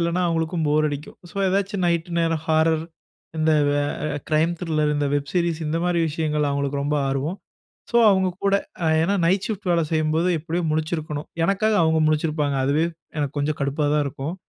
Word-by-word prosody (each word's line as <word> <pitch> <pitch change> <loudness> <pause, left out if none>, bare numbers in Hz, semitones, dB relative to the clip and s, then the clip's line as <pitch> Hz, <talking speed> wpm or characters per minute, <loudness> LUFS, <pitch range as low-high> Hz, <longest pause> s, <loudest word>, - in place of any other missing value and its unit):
இல்லனா 170 +2 0
அவங்களுக்கும் 165 -1 -1
போர் 155 +1 +3
அடிக்கும். 145 +1 -7
ஸோ - - -19
ஏதாச்சும் 195 0 0
நைட் 170 0 0
நேரம் 165 -2 0
ஹாரர் 160 0 +2 0.5
இந்த, 160 0 +2 0.2
வ - - +2 0.4
அ - - -3
க்ரைம் 155 +2 +2
த்ரில்லர் 155 -3 0
இந்த 145 -1 0
வெப் 145 0 -2
சீரிஸ் 170 -2 0
இந்த 155 +2 -1
மாதிரி 175 -1 +1
விஷயங்கள்ள 150 -1 -1
அவங்களுக்கு 140 0 -1
ரொம்ப 150 +1 0
ஆர்வம். 140 +8 -2 0.5
ஸோ 235 - +1
அவங்க 190 -1 +2 0.2
கூட 200 - +3 0.3
அ - - +2 0.2
ஏனா 195 +5 +1
நைட் 190 +3 +2
ஷிஃப்ட் 205 -3 -4
வேல 170 -1 +2
செய்யும்போது 160 +2 +1
எப்படியும் 165 0 -2
முழிச்சிருக்கணும். 155 -1 -3 0.2
எனக்காக 210 +3 +2
அவங்க 160 0 +3
முழிச்சிருப்பாங்க. 150 -2 0
அதுவே 145 +4 +2 0.3
எனக்கு 145 0 -2
கொஞ்சம் 145 +1 -1
கடுப்பா 145 +2 0
தான் 150 - +2
இருக்கும். 140 +5 -4
160 Hz, 180 wpm, -23 LUFS, 150-170 Hz, 0.5 s, போர்